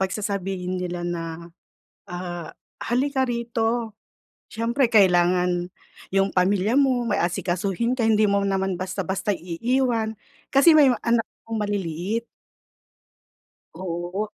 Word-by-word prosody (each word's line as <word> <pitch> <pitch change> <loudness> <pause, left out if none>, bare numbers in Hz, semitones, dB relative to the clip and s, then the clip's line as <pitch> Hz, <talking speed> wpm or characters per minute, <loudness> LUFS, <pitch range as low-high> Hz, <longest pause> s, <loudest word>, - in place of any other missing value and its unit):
'pag 190 - +1
sasabihin 190 -3 -3
nila 175 -1 -4
na, 170 -1 -5 0.6
ah, 175 -2 -6 0.3
"Halika 265 +2 +1
rito." 235 -2 -2 0.6
Siyempre, 235 +3 +1
kailangan 180 -2 +3 0.4
yung 195 0 +2
pamilya 195 +4 +2
mo, 260 -4 +3
may - - +1
asikasuhin 190 +7 -1
ka, 240 - -1
hindi 215 -1 +4
mo 200 0 +2
naman 195 -1 0
basta-basta 190 +2 -2
iiwan 225 +5 -1 0.4
kasi 295 +4 +6
may 290 -4 +7
mga 240 - -2
anak 230 -1 +3 0.2
akong 225 - -3
maliliit. 205 +2 -2 1.5
Oo. 180 +3 -3
200 Hz, 115 wpm, -24 LUFS, 180-230 Hz, 1.5 s, may